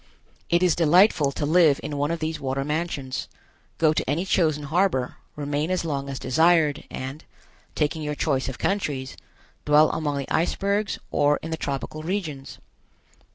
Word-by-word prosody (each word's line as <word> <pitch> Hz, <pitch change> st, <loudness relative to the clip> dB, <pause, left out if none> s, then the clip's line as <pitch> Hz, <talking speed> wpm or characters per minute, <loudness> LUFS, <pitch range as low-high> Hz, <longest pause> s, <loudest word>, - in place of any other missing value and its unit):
It 175 Hz, +1 st, +3 dB
is 180 Hz, -3 st, +4 dB
delightful 170 Hz, -2 st, +4 dB
to 145 Hz, -, -2 dB
live 155 Hz, -2 st, +4 dB
in 150 Hz, -, -4 dB
one 145 Hz, +1 st, 0 dB
of 170 Hz, -, -1 dB
these 160 Hz, 0 st, -3 dB
water 135 Hz, 0 st, -2 dB
mansions, 150 Hz, -4 st, -3 dB, 0.5 s
go 155 Hz, -2 st, +3 dB
to 155 Hz, -, -2 dB
any 165 Hz, +6 st, 0 dB
chosen 155 Hz, -6 st, +1 dB
harbor, 155 Hz, -4 st, 0 dB, 0.2 s
remain 145 Hz, +2 st, -2 dB
as 185 Hz, -2 st, -1 dB
long 140 Hz, -3 st, -3 dB
as 135 Hz, -, -4 dB
desired 155 Hz, +2 st, +2 dB
and, 135 Hz, +4 st, -6 dB, 0.5 s
taking 155 Hz, +1 st, 0 dB
your 150 Hz, -1 st, -3 dB
choice 135 Hz, -4 st, 0 dB
of 130 Hz, -, -7 dB
countries, 145 Hz, -10 st, -2 dB, 0.5 s
dwell 150 Hz, +1 st, +5 dB
among 150 Hz, -3 st, -2 dB
the 140 Hz, -, -5 dB
icebergs 200 Hz, +5 st, 0 dB
or 145 Hz, 0 st, +3 dB
in 160 Hz, -, -5 dB
the -, -, 0 dB
tropical 140 Hz, +1 st, -4 dB
regions. 160 Hz, -6 st, -4 dB
150 Hz, 160 wpm, -24 LUFS, 140-170 Hz, 0.5 s, dwell